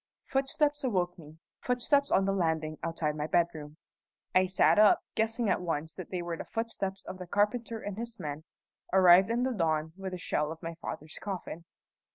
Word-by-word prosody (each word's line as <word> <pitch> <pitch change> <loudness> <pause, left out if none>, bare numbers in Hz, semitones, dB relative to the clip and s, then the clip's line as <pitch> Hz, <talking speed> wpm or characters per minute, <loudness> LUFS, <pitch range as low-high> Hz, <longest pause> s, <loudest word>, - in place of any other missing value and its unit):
Footsteps 290 +2 0
awoke 180 -8 0
me 155 0 -13 0.2
footsteps 280 +3 +1
on 190 - +3
the 195 - +1
landing 160 -4 -1
outside 165 -2 -2
my 150 0 -2
bedroom. 160 -3 0 0.6
I 185 0 +4
sat 185 +3 +4
up, 210 -1 +6
guessing 225 +1 0
at 190 - +1
once 160 -2 -2
that 185 - -8
they 180 -2 -3
were 170 -1 -3
the - - -6
footsteps 200 -4 -4
of 185 - -7
the 180 - -7
carpenter 225 +4 0
and 205 0 -5
his 235 -1 -6
men, 150 0 -5 0.5
arrived 185 +1 +7
in 235 +2 +1
the 260 0 0
dawn 160 -5 0
with 190 -1 -6
the - - -3
shell 150 -3 -1
of 165 +1 -9
my 165 0 -4
father's 155 +1 -7
coffin. 180 -4 -5
185 Hz, 190 wpm, -30 LUFS, 160-220 Hz, 0.6 s, arrived